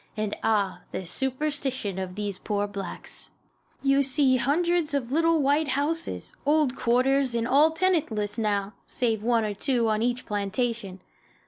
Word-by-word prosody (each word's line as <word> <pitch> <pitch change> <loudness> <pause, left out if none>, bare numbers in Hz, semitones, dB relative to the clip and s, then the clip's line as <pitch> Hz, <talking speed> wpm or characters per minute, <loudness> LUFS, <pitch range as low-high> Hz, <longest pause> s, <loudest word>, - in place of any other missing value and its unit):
And, 215 -1 -2
ah, 210 -3 0
the 190 - -4
superstition 265 - -1
of 185 -1 -5
these 205 -2 -3
poor 205 -1 -1
blacks! 200 -1 -4 0.5
You 275 0 +4
see 265 -1 +3
hundreds 320 +4 +1
of 255 -3 -2
little 330 0 +3
white 290 +3 +2
houses, 310 +4 -2
old 295 -3 +2
"quarters," 255 +1 +2
and 230 0 0
all 285 +5 +5
tenantless 295 - 0
now, 205 -2 0
save 225 -4 -1
one 230 0 +2
or 210 - -2
two 235 +2 +1
on 215 0 +1
each 245 +1 -1
plantation. 205 -1 -2
245 Hz, 145 wpm, -26 LUFS, 210-285 Hz, 0.5 s, all